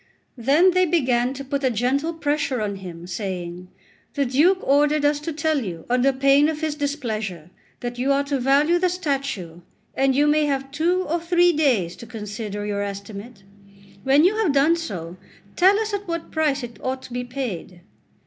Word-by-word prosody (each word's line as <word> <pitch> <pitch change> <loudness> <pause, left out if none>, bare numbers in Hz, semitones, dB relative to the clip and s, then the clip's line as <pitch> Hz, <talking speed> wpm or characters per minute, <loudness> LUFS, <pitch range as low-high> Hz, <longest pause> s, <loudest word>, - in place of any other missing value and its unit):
Then 295 +10 +4
they 365 0 +3
began 255 -7 +1
to 275 - -6
put 280 +1 -3
a 260 - +3
gentle 255 +7 0
pressure 295 -4 -1
on 205 -2 -2
him, 175 -3 -9
saying: 180 -1 -5 0.5
"The 280 -1 +1
Duke 300 +10 +3
ordered 290 +1 +3
us 290 0 +2
to 300 +3 -4
tell 310 -2 0
you, 170 -5 -6
under 250 +2 +3
pain 275 +2 +4
of 310 -1 -4
his 315 -1 -1
displeasure, 220 - -4 0.3
that 245 0 -5
you 265 +3 +1
are 280 0 +2
to 280 -1 -2
value 285 +7 +3
the 365 0 +2
statue, 275 - -3 0.3
and 270 -1 +2
you 290 +2 +4
may 300 0 +3
have 270 -1 -2
two 345 +6 +1
or 335 +1 -1
three 350 +1 +3
days 240 - +1
to 235 - -10
consider 210 -2 -6
your 205 -1 -2
estimate. 200 +2 -7 0.6
When 275 +3 +4
you 410 +4 +3
have 405 -10 +2
done 285 +4 +4
so, 180 - -6 0.4
tell 385 +3 +5
us 440 -1 -2
at 405 -1 -3
what 335 -1 -4
price 295 -4 0
it 235 -3 -8
ought 260 0 -3
to 245 - -10
be 245 0 -2
paid." 235 -9 -6
275 Hz, 185 wpm, -23 LUFS, 220-310 Hz, 0.6 s, tell